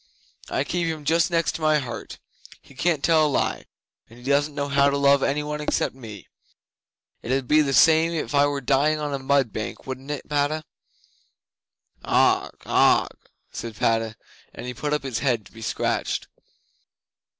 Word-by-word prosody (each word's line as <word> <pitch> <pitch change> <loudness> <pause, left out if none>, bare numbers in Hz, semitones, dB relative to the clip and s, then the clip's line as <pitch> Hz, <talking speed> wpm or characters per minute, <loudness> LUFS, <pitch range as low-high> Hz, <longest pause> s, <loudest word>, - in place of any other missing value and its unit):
"I 135 - 0
keep 170 +3 -2
him 155 -2 -4
just 165 +3 +2
next 165 -3 0
my 155 -1 +3
heart. 120 -6 -6 0.4
He - - -19
can't 155 +2 0
tell 160 -2 +4
a - - -1
lie, 140 - -1 0.4
and 115 - -15
he 120 - -15
doesn't 145 +2 +1
know 140 -1 -2
how 140 0 +3
to 140 - 0
love 140 0 +4
any 145 +2 0
one 150 0 -4
except 150 - -1
me. 110 -6 -11 0.9
It 120 - -5
'ud 130 -1 0
be 155 +1 +5
the 140 -2 0
same 160 +3 +5
if 160 -3 -3
I 145 0 +4
were 145 -1 -2
dying 140 +4 +2
on 150 -1 -3
a 140 - -2
mud 135 -4 +1
bank, 110 - -5
wouldn't 130 +1 -7
it, 150 -2 -5
Padda?" 150 +2 0 1.4
'"Augh! - - +2 0.2
Augh!" - - +4 0.4
said 115 -2 -7
Padda, 115 0 0 0.4
and 125 0 -6
put 145 +4 -3
up 150 -1 0
his 130 -4 -3
head 120 -6 0
to - - -17
be 115 - -13
scratched. 110 - -2
140 Hz, 175 wpm, -24 LUFS, 130-150 Hz, 1.4 s, be